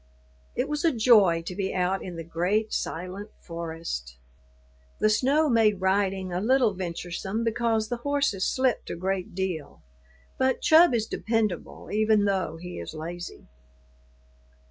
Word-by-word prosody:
It 250 - 0
was 300 0 -2
a 330 - +4
joy 215 - +5
to 180 - -4
be 190 -1 -2
out 185 +1 0
in 180 -2 -7
the 165 - -5
great, 180 +7 0
silent 185 +5 -4
forest. 165 - -6 0.8
The 215 - +3
snow 280 +8 +3
made 220 -6 +3
riding 190 -1 0
a 180 - -1
little 245 -1 +3
venturesome 185 +4 -4
because 230 -1 0
the 245 - -2
horses 280 -6 0
slipped 260 -1 0
a - - -3
great 185 0 -3
deal, 180 -6 -4 0.6
but 260 -1 +2
Chub 320 -4 +6
is 220 -2 0
dependable 220 -5 -2
even 215 0 +3
though 190 -5 -1
he 180 - -7
is 85 - -7
lazy. 175 +3 -7
195 Hz, 145 wpm, -26 LUFS, 175-230 Hz, 0.8 s, Chub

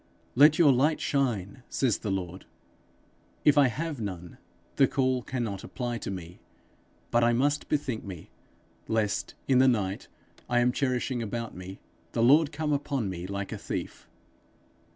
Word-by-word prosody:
'Let 150 +4 +6
your 150 -5 +6
light 150 +5 +2
shine,' 120 -7 -1
says 125 -6 +1
the 105 - -4
Lord: 95 -1 -4 1.0
if 150 - +6
I 145 -2 +6
have 150 +1 -4
none, 90 -4 -6 0.4
the 135 - +6
call 130 -2 +1
cannot 115 -6 -4
apply 120 -2 -4
to - - -5
me; 90 -2 -7 0.7
but 120 0 +3
I 120 0 +4
must 145 +5 +1
bethink 145 -6 -1
me, 95 -5 -9 0.6
lest, 110 -2 -1
in 130 -2 +4
the 130 - +6
night 100 -6 0 0.4
I 120 - +2
am 120 +1 +3
cherishing 125 -1 -1
about 115 +1 -4
me, 90 +1 -9 0.3
the 115 - +1
Lord 145 +5 +5
come 150 0 -1
upon 140 -7 -1
me 90 0 -6
like 100 0 -4
a - - -5
thief. - - -6
120 Hz, 155 wpm, -28 LUFS, 100-140 Hz, 1.0 s, Let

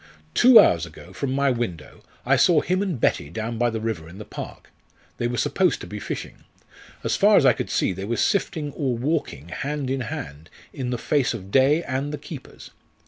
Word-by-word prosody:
_ - - -35
Two 245 -1 +8
hours 85 -1 +4
ago, 85 +3 -13
from 140 +4 -3
my 140 0 +2
window, 105 -11 -4 0.2
I - - +4
saw 165 -4 +4
him 185 +1 0
and 185 -10 -2
Betty 70 - +1
down 110 +6 -4
by 120 0 +3
the 110 -1 -3
river 110 -8 -4
in 90 - -12
the 105 - -8
park. - - -9 0.5
They 120 - 0
were 120 0 -3
supposed 180 +2 +1
to - - -6
be 105 - -7
fishing. - - -6 0.6
As - - 0
far - - +5
as - - +4
I - - +7
could - - -4
see - - +1
they 95 +2 -6
were 115 +2 -2
sifting 155 -7 0
or 135 -5 -2
walking 125 - -2
hand 140 - -3
in 135 0 -1
hand, 75 - -7 0.2
in 130 -2 -4
the 125 - -1
face 120 +1 0
of 95 -3 -9
day 140 +7 +4
and 140 +1 -3
the 150 - -4
keepers. 145 -3 -11
125 Hz, 215 wpm, -24 LUFS, 100-145 Hz, 0.6 s, Two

